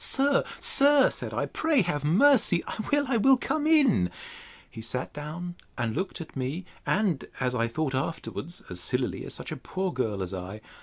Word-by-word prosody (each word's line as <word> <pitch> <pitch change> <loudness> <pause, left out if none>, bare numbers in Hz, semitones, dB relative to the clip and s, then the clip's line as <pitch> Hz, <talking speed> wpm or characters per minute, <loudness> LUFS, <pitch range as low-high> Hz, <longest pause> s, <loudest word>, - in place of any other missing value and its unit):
Sir, 275 +1 +3 0.2
sir, 280 -1 +5
said - - -5
I, - - -1
pray 310 -8 +1
have 150 -5 -2
mercy; 190 - +4
I - - -6
will, 290 0 +3
I 250 -2 +2
will 265 +4 +5
come 305 +4 -1
in! 275 - +4 0.6
He 110 - -10
sat 125 +3 -4
down, 155 +4 -6 0.2
and 120 -2 -1
looked 190 +2 -3
at 165 - -9
me, 135 +7 -3 0.2
and, 185 - +1
as 125 -1 0
I 115 -2 +1
thought 135 +3 -2
afterwards, 160 +4 -4
as 90 - -7
sillily - - -2
as - - -6
such - - -7
a - - -3
poor 185 -1 -3
girl 110 -7 -1
as 90 - -5
I. 95 +3 -6
165 Hz, 190 wpm, -27 LUFS, -, 0.6 s, sir